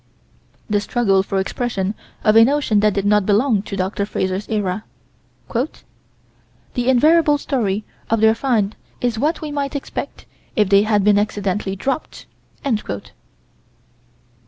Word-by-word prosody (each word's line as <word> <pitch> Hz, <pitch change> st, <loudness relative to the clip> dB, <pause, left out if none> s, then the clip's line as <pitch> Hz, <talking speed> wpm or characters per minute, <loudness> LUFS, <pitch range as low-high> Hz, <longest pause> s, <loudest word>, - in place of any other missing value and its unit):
The 205 Hz, -1 st, +1 dB
struggle 205 Hz, -4 st, +2 dB
for 195 Hz, 0 st, -2 dB
expression 195 Hz, -1 st, -2 dB, 0.3 s
of 215 Hz, -, +4 dB
a 225 Hz, -, +9 dB
notion 270 Hz, -4 st, +2 dB
that 210 Hz, -1 st, +2 dB
did 200 Hz, -1 st, -1 dB
not 210 Hz, 0 st, +4 dB
belong 215 Hz, +1 st, +3 dB
to 200 Hz, -, -6 dB
Dr. 190 Hz, +2 st, -1 dB
Frazer's 190 Hz, 0 st, -2 dB
era: 205 Hz, -2 st, -1 dB, 0.7 s
"The 250 Hz, +6 st, -1 dB, 1.1 s
invariable 300 Hz, +4 st, +4 dB
story 220 Hz, -8 st, -1 dB, 0.3 s
of 225 Hz, -, +2 dB
their 220 Hz, 0 st, +5 dB
find 225 Hz, -4 st, 0 dB, 0.2 s
is 240 Hz, -3 st, -1 dB
what 310 Hz, +7 st, 0 dB
we 305 Hz, -1 st, -5 dB
might 285 Hz, 0 st, -3 dB
expect 285 Hz, -, -5 dB, 0.3 s
if 210 Hz, -3 st, +2 dB
they 200 Hz, 0 st, +6 dB
had 210 Hz, -1 st, +2 dB
been 205 Hz, 0 st, +4 dB
accidentally 205 Hz, -2 st, -2 dB
dropped...." 270 Hz, +9 st, -4 dB
215 Hz, 135 wpm, -20 LUFS, 200-250 Hz, 1.1 s, a